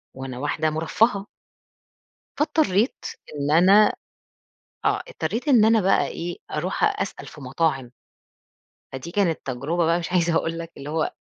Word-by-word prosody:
وأنا 130 -1 -7
واحدة 155 +2 0
مُرفَّهة. 195 +6 +1 1.1
فاضطرّيت 285 - +1 0.3
إن 145 0 -1
أنا 195 +6 +6 0.9
آه، - - +2
اضطرّيت 295 - -4
إن 235 -6 +6
أنا 225 -1 +4
بقى 195 +1 +2
إيه، 170 +1 -5
أروح 170 +5 0
أسأل 195 - -5
في 150 - -12
مطاعم. 135 -2 -1 1.0
فدي 130 +6 -7
كانت 180 -5 +1
تجربة 145 +7 -1
بقى 170 +1 +2
مش 170 - -6
عايزة 170 -2 +2
أقول 165 +1 -1
لك 165 0 -7
اللي 140 +2 -8
هو 160 0 -1
170 Hz, 140 wpm, -23 LUFS, 150-200 Hz, 1.1 s, أنا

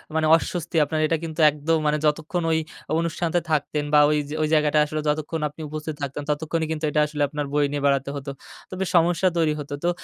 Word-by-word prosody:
মানে 160 -1 +2
অস্বস্তি, 170 0 -3
আপনার 155 +1 -2
এটা 165 - +1
কিন্তু 160 0 -6
একদম 155 +2 0
মানে 150 - +2
যতক্ষণ 160 +3 0
ওই 160 - +2 0.4
অনুষ্ঠান 170 0 -1
তে - - +5
থাকতেন 150 0 0
বা 150 - +7
ওই 150 - +2
জা 155 - -4
ওই 155 - +2
জায়গাটায় 150 0 +4
আসলে 155 0 -3
যতক্ষণ 155 +1 -2
আপনি 155 - -12
উপস্থিত 155 0 -5
থাকতেন, 140 +1 -4
ততক্ষণই 160 +2 -1
কিন্তু 155 0 -2
এটা 150 - +2
আসলে 150 -1 -2
আপনার 150 -1 -3
বয়ে 145 -1 +3
নিয়ে 145 -1 -2
বেড়াতে 140 0 +2
হত। 140 0 -7 0.4
তো - - -10
বেশ 190 - -1
সমস্যা 170 +2 +3
তৈরি 155 -2 +2
হত। 145 0 -8
তো 175 - +2
155 Hz, 220 wpm, -24 LUFS, 150-165 Hz, 0.4 s, বা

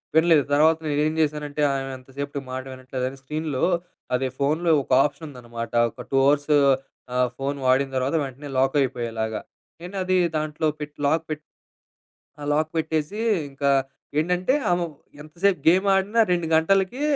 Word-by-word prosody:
వినలేదు. 160 -3 +5
తర్వాత 160 +2 +5
నేనేం 150 +1 +1
చేశానంటే 150 -1 -1
ఆమె 135 0 -2
ఎంతసేపటికి 140 +2 -6
మాట 130 0 -4
వినట్లేదని, 130 +1 -5
స్క్రీన్‌లో 150 -1 -3 0.5
అదే 130 +1 0
ఫోన్‌లో 160 +4 +1
ఒక - - -14
ఆప్షన్ 145 +2 -5
ఉందన్నమాట, 120 -3 -7 0.2
ఒక - - -10
2 135 - +2
అవర్స్ 145 +1 +2 0.6
ఆ - - +1 0.2
ఫోన్ 140 +1 -2
వాడిన 130 +2 +3
తర్వాత 130 +4 0
వెంటనే 140 +2 -7
లాక్ 135 +2 +2
అయిపోయేలాగా. 115 -4 -3 0.4
నేనది 185 +1 -2 0.2
దాంట్లో 155 +1 -1
పెట్టి 150 0 -7
లాక్ 160 +3 +2
పెట్టి 155 -1 -2 1.0
ఆహ్, 145 - -5
లాక్ 155 +1 +1
పెట్టేసి 160 +5 -1 0.3
ఇంకా, 140 +1 0 0.5
ఏంటంటే 180 +8 +1 0.2
ఆమె 175 0 +2 0.4
ఎంతసేపు 175 +5 0
గేమ్ 185 +4 +5
ఆడినా, 195 +4 +1
2 175 -2 +1
గంటలకి, 195 - +2
150 Hz, 140 wpm, -24 LUFS, 135-160 Hz, 1.0 s, వినలేదు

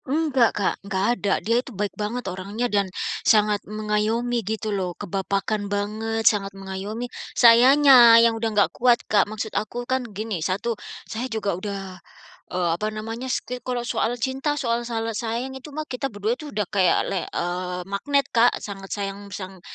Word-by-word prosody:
Enggak 275 -4 +2
Kak, 200 - +1
nggak 195 -1 -1
ada, 205 -4 0
dia 230 +3 +3
itu 265 - -12
baik 205 0 -2
banget 220 +4 -4
orangnya 195 +5 -3
dan 200 -2 +2 0.3
sangat 210 -1 +3
mengayomi 215 +3 0
gitu 215 +1 -3
loh, 185 -3 -3
kebapakan 200 +2 -2
banget, 220 +2 -2
sangat 195 -2 +2
mengayomi. 195 +4 -5 0.3
Sayanya 245 0 +8
yang 230 0 +5
sudah 225 0 -1
enggak 210 -2 +2
kuat 245 -1 +4
Kak. 205 -1 +2
Maksud 215 0 -5
aku 240 +3 -3
kan 260 +1 0
gini, 210 -3 -4
1, 195 +8 -1 0.3
saya 240 +4 -4
juga 215 -4 -1
sudah 190 0 -6 0.5
eee, 180 -1 0
apa 210 +5 -2
namanya, 225 +4 -5
setiap 250 0 -3
kalau 245 -1 -1
soal 235 0 0
cinta, 270 +4 -1
soal 235 -4 0
salah 225 -1 -2
sayang 235 +4 -3
itu 265 +3 -11
mah 310 +1 -5
kita 260 0 -3
berdua 205 +3 -1
itu 300 +1 -8
udah 210 -1 0
kayak 190 -3 +4
le 190 - -1
eee, 180 +1 -3
magnet 275 +9 0
Kak. 235 +1 +4
Sangat 195 -1 -8
sayang, 200 0 -5
sang 190 -2 -8
215 Hz, 170 wpm, -24 LUFS, 200-240 Hz, 0.5 s, Sayanya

